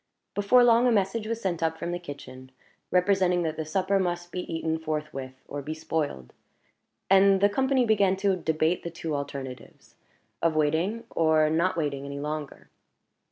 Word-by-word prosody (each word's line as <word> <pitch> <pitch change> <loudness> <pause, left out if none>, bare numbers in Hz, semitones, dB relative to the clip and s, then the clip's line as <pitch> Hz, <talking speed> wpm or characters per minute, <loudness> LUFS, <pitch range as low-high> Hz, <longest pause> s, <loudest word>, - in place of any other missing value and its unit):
Before 205 +5 +4
long 240 +1 +5
a - - +4
message 215 +1 0
was 230 0 -2
sent 180 -6 -2
up 160 0 0
from 170 - -4
the 175 - -3
kitchen, 130 -5 -10 0.4
representing 180 -1 +2
that 160 -1 -2
the 160 - -3
supper 190 +5 +1
must 175 -1 -2
be 180 +1 -5
eaten 160 0 -1
forthwith, 150 -4 -4
or 145 - -5
be 155 +3 -5
spoiled; 150 - -3 0.7
and 195 0 +5
the 200 - +5
company 265 +3 +2
began 200 -4 +3
to 195 0 +1
debate 160 0 0
the 170 - -5
two 165 -2 -5
alternatives 140 -2 -7 0.5
of 165 -1 +2
waiting, 160 +9 +1
or 155 -1 +3
not 170 +3 +1
waiting, 145 -4 -2
any 140 0 -6
longer. 150 0 -6
165 Hz, 165 wpm, -27 LUFS, 155-195 Hz, 0.7 s, long